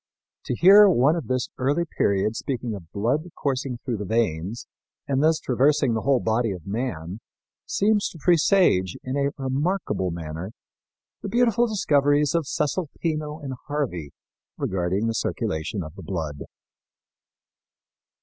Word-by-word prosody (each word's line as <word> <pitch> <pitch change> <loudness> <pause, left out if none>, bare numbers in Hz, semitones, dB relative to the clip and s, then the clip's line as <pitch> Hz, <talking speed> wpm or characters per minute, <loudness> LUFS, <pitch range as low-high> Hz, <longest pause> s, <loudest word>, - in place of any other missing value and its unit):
To 125 - -2
hear 200 - +8
one 145 -1 +4
of 170 - -4
this 130 -1 -1
early 145 +7 +1
period 100 - 0
speaking 125 -2 -3
of 85 -5 -9
blood 130 - -1
coursing 135 -2 -2
through 120 -2 -4
the 105 - -5
veins 105 -2 -1 0.4
and 135 -1 +1
thus 160 +1 +4
traversing 135 -1 +2
the 110 - -1
whole 135 -2 +3
body 115 +1 0
of 90 -4 -10
man 100 -4 -4 0.5
seems 210 0 +2
to - - -12
presage, 165 - +3
in 130 +1 -3
a 140 0 +1
remarkable 140 - -1
manner, 85 +4 -6 0.7
the 200 - -5
beautiful 240 +1 +3
discoveries 145 -7 +2
of 165 -4 0
Cesalpino 155 -1 -2
and 135 -2 -4
Harvey 120 - -3 0.5
regarding 95 +3 -1
the 115 - 0
circulation 90 -2 -2
of 75 -1 -9
the - - -11
blood. 80 -6 -4
130 Hz, 140 wpm, -24 LUFS, 100-155 Hz, 0.7 s, hear